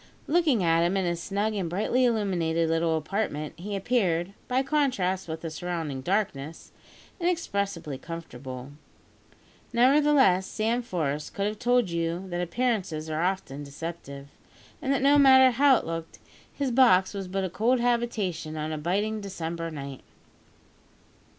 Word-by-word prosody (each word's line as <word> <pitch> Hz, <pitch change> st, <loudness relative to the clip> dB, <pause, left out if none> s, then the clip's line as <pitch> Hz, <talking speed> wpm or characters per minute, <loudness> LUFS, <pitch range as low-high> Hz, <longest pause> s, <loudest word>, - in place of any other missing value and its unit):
Looking 300 Hz, -, +2 dB
at 165 Hz, 0 st, +3 dB
him 175 Hz, +3 st, +1 dB
in 190 Hz, -, 0 dB
his 170 Hz, -1 st, -1 dB
snug 205 Hz, +4 st, -1 dB
and 190 Hz, -5 st, -2 dB
brightly 215 Hz, +8 st, +1 dB
illuminated 175 Hz, -8 st, +1 dB
little 165 Hz, 0 st, +1 dB
apartment, 155 Hz, -3 st, -3 dB
he 200 Hz, +4 st, -5 dB
appeared 195 Hz, -4 st, 0 dB
by 255 Hz, +1 st, +1 dB
contrast 250 Hz, -11 st, 0 dB
with 160 Hz, 0 st, -5 dB
the 165 Hz, -, -5 dB
surrounding 160 Hz, -4 st, -4 dB
darkness 160 Hz, -4 st, -2 dB, 0.5 s
inexpressibly 200 Hz, -, -2 dB
comfortable. 135 Hz, -6 st, -8 dB, 1.0 s
Nevertheless, 260 Hz, -6 st, +4 dB
Sam 230 Hz, +3 st, 0 dB
Forest 155 Hz, -, -3 dB
could 200 Hz, -, -1 dB
have 210 Hz, 0 st, -3 dB
told 245 Hz, -5 st, +2 dB
you 170 Hz, +2 st, -2 dB
that 175 Hz, 0 st, -2 dB
appearances 180 Hz, -6 st, -1 dB
are 155 Hz, +1 st, -1 dB
often 175 Hz, -6 st, -2 dB
deceptive, 140 Hz, -1 st, -8 dB, 0.5 s
and 270 Hz, -, -1 dB
that 270 Hz, -1 st, +1 dB
no 285 Hz, +1 st, +6 dB
matter 260 Hz, -2 st, +7 dB
how 270 Hz, +1 st, +5 dB
it -, -, -5 dB
looked, 165 Hz, 0 st, -5 dB, 0.3 s
his 275 Hz, -3 st, -2 dB
box 230 Hz, -7 st, +5 dB
was 195 Hz, -2 st, -5 dB
but 190 Hz, +1 st, -2 dB
a 185 Hz, -, -1 dB
cold 240 Hz, +6 st, +2 dB
habitation 220 Hz, -10 st, -1 dB
on 155 Hz, +1 st, -3 dB
a 155 Hz, -, -3 dB
biting 205 Hz, +7 st, -1 dB
December 170 Hz, -4 st, -4 dB
night. 140 Hz, -4 st, -7 dB
185 Hz, 145 wpm, -27 LUFS, 165-235 Hz, 1.0 s, matter